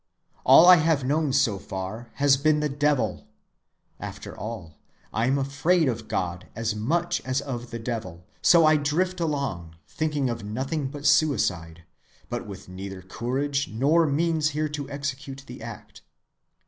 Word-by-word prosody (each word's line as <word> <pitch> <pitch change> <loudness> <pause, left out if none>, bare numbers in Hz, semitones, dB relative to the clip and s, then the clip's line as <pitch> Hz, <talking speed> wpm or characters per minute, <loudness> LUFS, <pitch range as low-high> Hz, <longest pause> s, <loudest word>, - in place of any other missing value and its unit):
All 135 +6 +8
I 180 0 +9
have 155 -3 +2
known 145 +2 +1
so 130 -7 +2
far 95 +6 -6
has 140 -1 +4
been 150 +2 +2
the 150 - +1
devil. 145 -2 0 0.7
After - - -8
all, 90 -9 -7 0.3
I 115 +2 +1
am 135 +2 +2
afraid 145 +5 +2
of 115 -3 -3
God 90 0 -3
as 115 0 -1
much 170 +11 0
as 130 +1 0
of 120 -3 -5
the 115 - -5
devil, 110 -8 -5 0.2
so 170 -2 +6
I 155 0 +5
drift 175 +6 0
along, 140 - -2
thinking 150 -4 -1
of 115 -3 -3
nothing 130 +7 -3
but 145 +1 -8
suicide, 90 - +2 0.5
but 120 -2 -4
with 100 -2 -9
neither 95 0 -8
courage 135 +8 -2
nor 150 +9 +3
means 155 +1 +1
here 155 0 0
to 145 -2 -5
execute 140 -1 -5
the 125 -2 -10
act. 115 -2 -10
135 Hz, 155 wpm, -25 LUFS, 110-150 Hz, 0.7 s, I